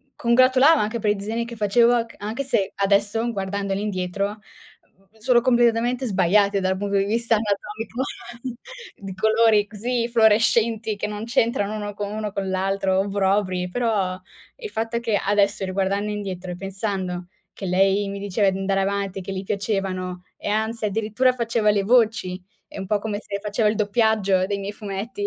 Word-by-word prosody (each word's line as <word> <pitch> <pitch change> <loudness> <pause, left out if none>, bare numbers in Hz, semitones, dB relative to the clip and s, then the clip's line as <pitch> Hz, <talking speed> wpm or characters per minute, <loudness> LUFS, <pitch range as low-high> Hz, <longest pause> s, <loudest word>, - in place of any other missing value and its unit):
congratulava 255 +5 +5
anche 215 +3 -1
per 210 -1 +1
i 210 - +1
disegni 220 +4 -3
che 235 0 -8
facevo 230 +3 +3
c - - -16
anche 220 +7 -4
se 200 -7 0
adesso, 205 +4 +1
guardandoli 195 0 -2
indietro, 200 +1 -2 0.6
mhmm, 195 +3 -28
sono 240 +1 +3
completamente 240 0 +2
sbagliati 200 +1 +3
dal 190 0 0
punto 200 0 -1
di 195 - +2
vista 230 +2 +1
anatomico, 215 +3 -3 0.9
di 195 -1 -8
colori 220 +1 +3
così 235 +2 -2
fluorescenti 225 -1 +3
che 205 - -3
non 210 +1 -5
c'entrano 230 -3 0
uno 205 -1 -4
con 205 0 -5
uno 210 -1 -3
con 195 -1 -3
l'altro, 190 0 0
obbrobri, 195 -2 0
però 200 -5 -1 0.4
il 445 -4 -7
fatto 225 +1 -2
che 230 -3 0
adesso 200 0 +2
riguardando 195 +2 -1
indietro, 190 -3 -5
e - - -5
pensando 190 -2 -4 0.3
che 195 - -7
lei 195 +2 +2
mi 200 0 -5
diceva 200 0 +1
di 190 - -4
andare 195 0 0
avanti, 200 -1 -2
e - - -6
che 195 - -6
gli 190 0 -4
piacevano, 190 -3 -3
e - - -7
anzi 220 +1 -1
addirittura 220 +5 +1
faceva 230 -3 +1
le 205 -1 +1
voci, 220 -5 +2 0.3
è - - -11
un 190 - -4
po' 205 +1 0
come 210 -1 -3
se 200 -1 -5
faceva 210 +1 0
il - - +1
doppiaggio 205 -3 +2
dei 200 0 -2
miei 200 +1 -4
fumetti. 210 - -5
205 Hz, 170 wpm, -23 LUFS, 195-225 Hz, 0.9 s, congratulava